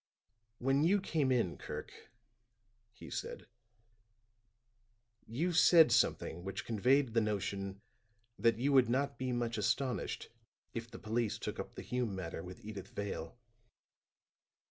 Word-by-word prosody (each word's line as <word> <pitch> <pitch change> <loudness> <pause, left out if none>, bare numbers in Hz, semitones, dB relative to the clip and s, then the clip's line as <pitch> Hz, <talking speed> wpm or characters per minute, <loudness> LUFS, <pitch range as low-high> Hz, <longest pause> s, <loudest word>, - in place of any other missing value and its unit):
"When 135 +4 +2
you 195 +5 +4
came 155 -8 0
in, 115 -9 +1
Kirk," - - -6 1.0
he - - -12
said, - - -5 1.8
"you 160 +11 -1
said 165 -1 +7
something 85 +2 +2
which 95 0 -4
conveyed 125 +3 +2
the 115 - +4
notion 100 -2 -2 0.6
that 115 +1 +4
you 140 +4 +1
would 130 -3 +6
not 140 +3 0
be 130 0 -1
much 120 -2 -1
astonished 125 +5 -1 0.4
if 115 0 -5
the 115 - -9
police 110 0 -1
took - - -5
up - - -6
the - - -7
Hume 125 -5 -2
matter 85 -3 -5
with 90 +6 -10
Edyth 100 -3 -7
Vale." 100 -3 -5
115 Hz, 130 wpm, -34 LUFS, 100-135 Hz, 1.8 s, said